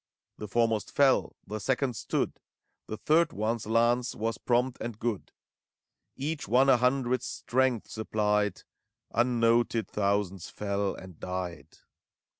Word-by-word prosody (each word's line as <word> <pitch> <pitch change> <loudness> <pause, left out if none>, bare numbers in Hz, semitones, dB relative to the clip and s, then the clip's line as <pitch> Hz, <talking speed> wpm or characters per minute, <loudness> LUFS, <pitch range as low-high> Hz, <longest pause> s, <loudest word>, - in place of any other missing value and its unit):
The 105 - -5
foremost 115 0 +1
fell, 140 -2 +3
the 105 +2 -5
second 130 +3 0
stood; - - -2 0.5
The 110 - -5
third 160 +5 +3
one's 110 +2 -2
lance 120 +2 +2
was 115 -1 -2
prompt 125 +1 +1
and 115 -3 -4
good; 115 -3 -3 0.8
Each 150 0 -3
one 130 +6 +4
a 130 - +7
hundred's 125 0 +1
strength 130 -2 0
supplied: 105 -2 0 0.5
Unnoted, 115 -1 +2
thousands 100 -3 -1
fell 100 -1 -2
and 95 -4 -12
died. 90 -2 -5
115 Hz, 120 wpm, -29 LUFS, 105-125 Hz, 0.8 s, a